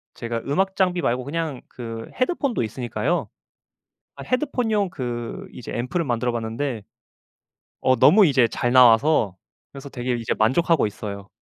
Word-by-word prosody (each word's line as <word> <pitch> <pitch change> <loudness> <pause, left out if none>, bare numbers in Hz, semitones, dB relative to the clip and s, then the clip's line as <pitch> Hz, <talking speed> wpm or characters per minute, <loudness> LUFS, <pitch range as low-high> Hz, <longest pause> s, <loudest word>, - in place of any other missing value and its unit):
제가 115 -1 -3
음악 190 +6 0
장비 180 -2 +1
말고 125 -2 0
그냥 150 -2 -3
그 115 -2 -7
헤드폰도 270 - 0
있으니까요. 120 +8 -2 0.9
아 - - -8
헤드폰용 245 -7 0
그 120 -7 -5
이제 120 - -8
앰프를 130 +9 -2
만들어 120 -2 0
봤는데 115 +1 -3 1.0
어 130 0 +3
너무 195 +6 +6
이제 135 -6 +4
잘 120 +3 -1
나와서 120 - +5 0.4
그래서 140 0 -9
되게 125 -1 -3
이제 115 -1 -2
만족하고 145 +6 +3
있어요. 100 -1 -7
130 Hz, 315 characters per minute, -23 LUFS, 115-170 Hz, 1.0 s, 너무